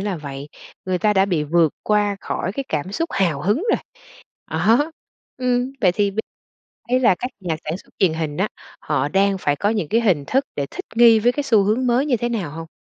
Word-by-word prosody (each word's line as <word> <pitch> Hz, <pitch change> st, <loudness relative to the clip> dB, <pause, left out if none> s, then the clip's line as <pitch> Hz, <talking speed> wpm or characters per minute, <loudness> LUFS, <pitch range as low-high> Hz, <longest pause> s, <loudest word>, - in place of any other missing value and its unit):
là 195 Hz, -2 st, -2 dB
vậy. 140 Hz, -1 st, -7 dB, 0.4 s
Người 185 Hz, -1 st, -1 dB
ta 210 Hz, +3 st, +2 dB
đã 190 Hz, -1 st, +4 dB
bị 170 Hz, -6 st, 0 dB
vượt 160 Hz, 0 st, +3 dB
qua 205 Hz, -1 st, +1 dB
khỏi 185 Hz, -, -3 dB
cái 275 Hz, +3 st, -4 dB
cảm 160 Hz, +5 st, -3 dB
xúc 330 Hz, +7 st, -1 dB
hào 170 Hz, -7 st, 0 dB
hứng 205 Hz, +6 st, +2 dB
rồi. -, -, +2 dB, 0.7 s
Đó, 225 Hz, -, +2 dB, 0.5 s
ừm, 250 Hz, 0 st, 0 dB
vậy 180 Hz, -3 st, +5 dB
thì 200 Hz, +1 st, 0 dB
bây 210 Hz, -, -4 dB, 0.7 s
ý 255 Hz, +1 st, +3 dB
là 205 Hz, -8 st, +4 dB
các 250 Hz, -, -4 dB
nhà 170 Hz, -4 st, -2 dB
sản 160 Hz, +4 st, -2 dB
xuất -, -, -18 dB
truyền 180 Hz, -5 st, +3 dB
hình 160 Hz, -2 st, -3 dB
á, 195 Hz, +3 st, +1 dB, 0.3 s
họ 150 Hz, -1 st, 0 dB
đang 195 Hz, 0 st, +2 dB
phải 145 Hz, -5 st, 0 dB
có 205 Hz, -, 0 dB
những 210 Hz, -8 st, -1 dB
cái 230 Hz, -, +2 dB
hình 180 Hz, -11 st, +2 dB
thức 270 Hz, +2 st, +1 dB
để 140 Hz, -, -1 dB
thích -, -, -7 dB
nghi 230 Hz, -1 st, +7 dB
với 240 Hz, +3 st, +3 dB
cái 290 Hz, +2 st, -3 dB
xu 220 Hz, -7 st, +4 dB
hướng 225 Hz, +6 st, +1 dB
mới 245 Hz, +4 st, +2 dB
như 255 Hz, -5 st, +1 dB
thế 240 Hz, +2 st, -2 dB
nào 195 Hz, -10 st, -3 dB
hông? 165 Hz, +2 st, -7 dB
200 Hz, 230 wpm, -21 LUFS, 165-235 Hz, 0.7 s, nghi